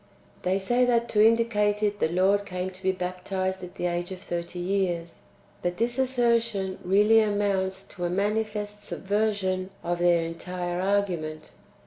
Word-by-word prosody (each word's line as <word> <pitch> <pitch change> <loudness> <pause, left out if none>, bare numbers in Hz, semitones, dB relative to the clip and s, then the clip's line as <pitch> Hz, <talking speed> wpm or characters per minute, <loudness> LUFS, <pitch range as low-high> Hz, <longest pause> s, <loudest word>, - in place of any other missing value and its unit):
They 185 +1 +1
say 240 +6 +2
that 235 -1 +2
to 210 -1 +4
indicate 215 -2 +3
it 205 -1 0
the - - +3
Lord 190 +4 +3
came 185 -1 -4
to 185 0 -13
be 190 0 +2
baptized 185 +1 -3
at 180 - -9
the - - -3
age 175 +1 -1
of 185 - -5
thirty 175 -2 -5
years. 175 -2 -1 0.4
But 175 0 -2
this 240 +3 0
assertion 235 -7 +1
really 205 +4 +5
amounts 200 -2 0
to 175 -3 -5
a - - 0
manifest 210 +2 -1
subversion 195 -3 -1
of 175 0 -1
their 175 -1 +4
entire 175 +1 -4
argument. 180 -6 -1
190 Hz, 155 wpm, -27 LUFS, 180-210 Hz, 0.4 s, really